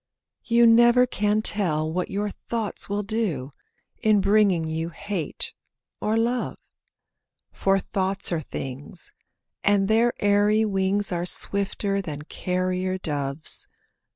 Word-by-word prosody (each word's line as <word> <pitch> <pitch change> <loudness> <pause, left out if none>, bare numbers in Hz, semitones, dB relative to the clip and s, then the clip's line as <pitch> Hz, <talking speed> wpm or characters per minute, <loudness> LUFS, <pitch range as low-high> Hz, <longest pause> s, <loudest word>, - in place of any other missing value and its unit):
You 235 0 +4
never 240 +2 +6
can 210 -2 0
tell 160 -8 +1
what 180 +1 -2
your 205 +1 -2
thoughts 225 -2 -4
will 205 +1 -1
do, 190 - -2 0.5
In 215 -1 +4
bringing 195 -4 +3
you 160 +1 -3
hate 185 -1 -4 0.5
or 215 +1 +1
love; 240 +2 -1 0.9
For 195 0 +1
thoughts 195 0 -1
are 165 -2 0
things, 135 +3 -7 0.5
and 200 -1 +3
their 230 +3 +3
airy 205 +2 +3
wings 195 0 +1
Are 175 0 -1
swifter 200 +1 0
than 150 -5 -6
carrier 185 +2 -2
doves. 145 -4 -2
195 Hz, 120 wpm, -24 LUFS, 175-215 Hz, 0.9 s, never